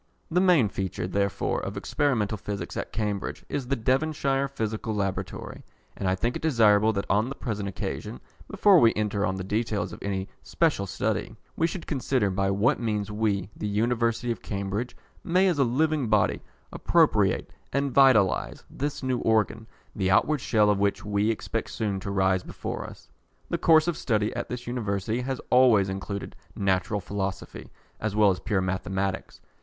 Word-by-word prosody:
The 180 +2 +3
main 175 - +5
feature, 95 -2 -3
therefore, 100 +1 -1
of - - -5
Experimental 120 -8 0
Physics 105 -1 -5
at - - -4
Cambridge 105 -3 -3
is 140 -4 -3
the 140 - +1
Devonshire 135 +2 0
Physical 110 -4 -3
Laboratory, 95 -2 -4 0.3
and 95 - -1
I 95 - +2
think 115 +6 -1
it - - -4
desirable 110 -7 +4
that 100 -1 -2
on 105 +5 +2
the 135 - -5
present 105 -5 -3
occasion, 95 - -5 0.3
before 200 -4 +5
we 115 -4 +5
enter 105 -1 0
on 95 - -1
the 95 - -4
details 105 +1 -2
of - - -10
any 95 -1 -3
special 150 -12 0
study, - - -2 0.2
we 165 - +2
should 170 +1 -6
consider 130 -7 0
by 95 +1 0
what 105 +8 +2
means 105 -3 -2
we, 105 -2 -1
the 105 - -4
University 115 +2 0
of 115 - -4
Cambridge, 100 +4 -4 0.3
may, 185 +3 +3
as 170 -6 +1
a - - +6
living 145 +2 +1
body, 105 -1 +2 0.3
appropriate - - +2 0.2
and 140 -1 0
vitalise 130 -8 +4
this 145 0 -4
new 130 -1 0
organ, 110 0 +1 0.3
the 95 -2 0
outward 145 +9 +3
shell 105 -3 +3
of 100 - 0
which 100 +1 0
we 105 +1 +1
expect 115 - -3
soon 100 -3 -2
to 100 - -6
rise 95 -1 +2
before - - -6
us. - - -16 0.4
The - - 0
course 160 0 +5
of 175 - 0
study 110 -6 0
at - - -4
this 125 0 -5
University 110 -1 -2
has 130 0 -3
always 120 -6 +5
included 100 +1 -5 0.2
Natural 95 +1 0
Philosophy, 95 -1 -5 0.3
as 105 -1 -2
well 105 -2 +5
as 90 - -3
Pure 100 -4 0
Mathematics. 95 +1 -3
110 Hz, 170 wpm, -26 LUFS, 100-130 Hz, 0.4 s, a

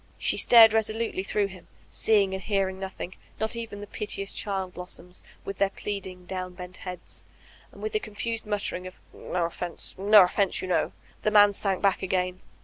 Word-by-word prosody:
She - - 0
stared 225 -2 +8
resolutely 220 -2 0
through 205 +1 0
him, 190 -2 -10 0.2
seeing 200 -3 +3
and 190 - -3
hearing 195 -2 -1
noth 190 -1 -7
ing, 185 - -5 0.3
not 220 +1 +1
even 225 -3 -6
the - - -6
piteous 200 -1 -2
child 190 -3 -3
blossonis, 180 0 -6 0.2
with 195 - -6
their 200 - +3
pleading, 190 -3 -6
downbent 180 0 -6
heads, 180 -1 -8 0.5
and - - -13
with 435 - -3
a 430 - +2
confused 225 - -4
nmtter 205 -1 0
ing 180 0 -8
of 185 - -12
''No 175 -1 -2
offense, 170 +1 -6
no 205 +1 +8
offense, 190 +1 +1
you - - -4
know," 185 - +1 0.3
the - - +2
man 205 -1 +6
sank 195 -1 -1
back 195 -1 +3
again. 185 -1 -1
195 Hz, 185 wpm, -27 LUFS, 185-210 Hz, 0.5 s, stared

